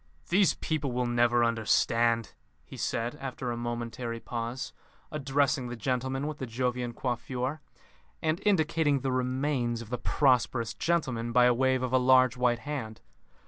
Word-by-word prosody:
"These 190 0 +4
people 150 -4 -2
will 125 0 0
never 120 0 +3
understand," 115 0 +2 0.3
he - - -11
said, 115 +1 -2
after 130 -2 -4
a - - -2
momentary 120 0 -4
pause, 120 +2 -5 0.4
addressing 140 -2 0
the 120 - -5
gentleman 130 +4 -2
with 150 0 -5
the 130 - -4
Jovian 125 +1 -2
coiffure, 125 +4 -3 0.6
and 160 +4 -1
indicating 160 -7 +2
the 135 - -1
remains 130 -1 0
of 115 -1 -9
the 125 - -2
prosperous 125 -4 +2
gentleman 130 -9 -1
by 125 +1 +5
a 125 - +5
wave 130 +1 +1
of 125 0 -2
a 130 - +5
large 130 0 +5
white 125 -1 +2
hand. 130 -7 -4
125 Hz, 150 wpm, -29 LUFS, 120-135 Hz, 0.6 s, by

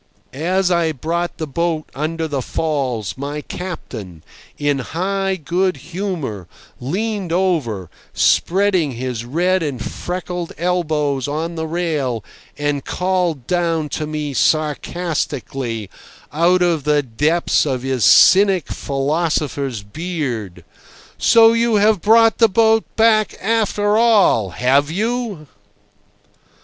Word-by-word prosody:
As 180 +6 0
I 170 -2 +1
brought 170 +5 -3
the 160 - -3
boat 160 +2 -2
under 160 +3 -2
the 140 -3 -2
falls 130 -8 -2
my 145 +2 -4
captain, 110 - -7 0.3
in 145 -1 0
high 190 +7 -2
good 180 +1 -1
humour, 145 - -5 0.3
leaned 195 - -3
over, 155 - 0 0.2
spreading 185 -6 +2
his 120 -1 -4
red 180 +8 +1
and 145 -6 -3
freckled 175 +7 -5
elbows 155 -6 0
on 160 +4 -3
the 160 -1 -4
rail, 155 - -2 0.3
and 145 -1 -1
called 180 -7 -1
down 165 -3 0
to 155 +1 -3
me 150 -2 -4
sarcastically, 145 - -1 0.5
out 175 +4 +3
of 165 -4 +1
the 150 0 +2
depths 150 +7 +1
of 130 -3 -2
his 130 -3 -1
cynic 190 - +6
philosopher's 140 -4 -2
beard: 125 - -5 0.5
"So 225 0 +6
you 230 -1 +2
have 210 -2 +3
brought 225 +1 +4
the 225 -2 +6
boat 220 +2 +3
back 220 -1 +3
after 210 -1 +1
all, 210 - +4
have 135 - +2
you?" 215 -2 -2
160 Hz, 115 wpm, -19 LUFS, 140-185 Hz, 0.5 s, cynic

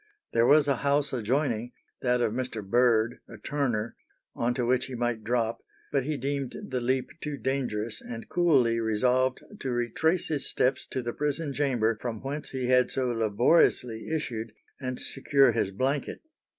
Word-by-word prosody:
There 115 +1 +4
was 150 0 +6
a 140 -3 +2
house 145 +1 +1
adjoining, 125 0 0 0.3
that 125 -1 +2
of 110 - +1
Mr. 115 -5 -4
Bird, 120 +1 +3
a - - -10
turner, 120 -7 -2 0.4
on 120 +1 0
to 125 -2 0
which 125 +1 +2
he 130 - -6
might 120 -2 -1
drop, 115 0 0 0.3
but 135 -3 +1
he 150 0 -1
deemed 140 0 -2
the 130 -1 -1
leap 130 +2 0
too 150 -2 -4
dangerous, 120 -5 -2
and 115 -1 -7
coolly 135 -10 +3
resolved 125 +4 +1 0.2
to 135 - -3
retrace 125 +9 0
his 150 -3 -2
steps 130 +1 0
to 130 - -3
the 120 0 -3
prison 150 0 -2
chamber, 120 -6 +1
from 115 -3 -3
whence 145 +3 -4
he 130 -2 -3
had 125 0 +4
so 130 -2 0
laboriously 115 +1 +2
issued, 120 -8 -3 0.3
and 130 -2 -4
secure 135 -1 +3
his 115 -4 0
blanket. 135 +8 -2
125 Hz, 165 wpm, -28 LUFS, 115-140 Hz, 0.4 s, was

